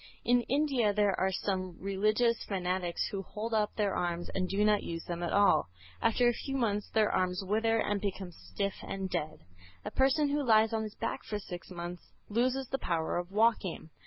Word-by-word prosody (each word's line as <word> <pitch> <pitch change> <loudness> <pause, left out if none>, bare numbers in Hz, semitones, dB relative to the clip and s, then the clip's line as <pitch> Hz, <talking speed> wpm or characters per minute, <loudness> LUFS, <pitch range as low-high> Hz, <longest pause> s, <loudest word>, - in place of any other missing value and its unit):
In 245 0 +4
India 270 -7 +2
there 205 -2 +3
are 190 0 +2
some 185 -2 -2
religious 215 +5 +1
fanatics 180 -2 -1
who 195 - -3
hold 215 +4 -5
up 210 -1 +1
their 205 -3 +1
arms 175 0 -2
and 185 -1 -1
do 205 +2 +2
not 210 -1 +4
use 165 -1 -5
them 175 0 -4
at 175 - -2
all; 200 - +4 0.3
after 240 +2 +3
a 240 - +4
few 270 +3 -4
months 210 -4 0
their 215 -1 +2
arms 185 +1 0
wither 225 +3 +2
and 205 -2 0
become 195 -3 -3
stiff 165 - -4
and 190 -1 -4
dead. 155 +1 -3 0.4
A - - -4
person 275 +2 +3
who 290 +1 +1
lies 220 -2 +4
on 220 - +1
his 215 -1 -6
back 230 - -3
for 210 - -3
six 180 -4 -8
months 175 -1 -6 0.3
loses 255 +4 +1
the 270 - -2
power 165 -5 -1
of 175 +1 -6
walking. 210 -6 +1
205 Hz, 195 wpm, -31 LUFS, 185-225 Hz, 0.4 s, In